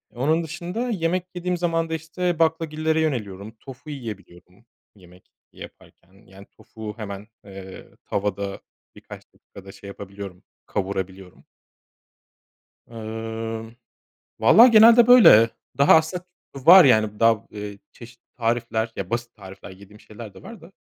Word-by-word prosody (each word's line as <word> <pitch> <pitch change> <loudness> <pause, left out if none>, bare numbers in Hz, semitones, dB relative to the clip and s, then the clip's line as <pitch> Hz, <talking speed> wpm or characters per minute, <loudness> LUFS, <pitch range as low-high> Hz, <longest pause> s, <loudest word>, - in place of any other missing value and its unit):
Onun 155 +7 0
dışında 175 +10 -5
yemek 180 -3 -1
yediğim 180 0 -3
zaman 165 -1 -1
da - - -4
işte 165 +2 -3
baklagillere 160 -1 0
yöneliyorum. 110 -8 -4
Tofu 135 +3 -13
yiyebiliyorum 100 -6 -10 0.3
yemek 90 -2 -20 0.2
yaparken. 95 - -15
Yani 95 +1 -15
tofu 110 -1 -10
hemen, 100 -2 -8 0.2
eee, 95 -1 -11 0.2
tavada 100 -1 -3 0.4
birkaç - - -13
dakikada 95 0 -15
şey 100 0 -14
yapabiliyorum, 100 -2 -10 0.2
kavurabiliyorum. 95 -2 -6 1.5
Eee, 115 0 -7 0.6
valla 220 - +7
genelde 230 0 +7
böyle. 155 - +7 0.3
Daha 140 - +6
aslında 160 +3 -1 0.3
t 135 +2 -11
var 180 +1 +9
yani 110 -4 +2
daha, 115 -2 +3
eee, 105 -1 -8
çeşitli 120 0 -15
tarifler, 115 -1 -2
ya 95 -2 -6
basit 120 0 -4
tarifler 95 -1 -12
yediğim 100 +2 -16
şeyler 110 -2 -12
de 95 - -15
var 230 -4 -12
da. 165 +4 -16
115 Hz, 125 wpm, -22 LUFS, 100-160 Hz, 1.5 s, var